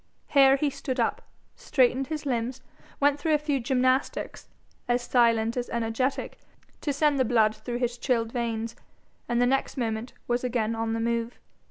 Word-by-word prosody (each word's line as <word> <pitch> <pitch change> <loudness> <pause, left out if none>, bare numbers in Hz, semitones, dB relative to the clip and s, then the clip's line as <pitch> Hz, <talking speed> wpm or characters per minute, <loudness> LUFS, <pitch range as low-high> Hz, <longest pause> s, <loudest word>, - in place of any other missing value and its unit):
Here 270 -1 +6
he 285 +1 0
stood 260 -1 -4
up, 410 - 0 0.3
straightened 260 0 +1
his 305 -1 -4
limbs, 250 0 -2 0.4
went 285 0 +3
through 310 +1 +2
a - - +4
few 295 -2 -1
gymnastics, 255 +2 0 0.4
as 245 0 +1
silent 230 -2 +2
as 245 -1 -3
energetic, 235 +3 -2 0.4
to 290 - -1
send 285 0 +2
the - - +5
blood 220 -3 +3
through 240 +3 -5
his 245 -1 -2
chilled 230 -4 0
veins, 230 -1 -3 0.5
and 240 0 +1
the 245 - +4
next 270 +3 0
moment 225 -1 -2
was 240 +1 0
again 230 -3 0
on 225 0 -2
the 225 - -1
move. 235 +1 -1
245 Hz, 170 wpm, -27 LUFS, 230-270 Hz, 0.5 s, Here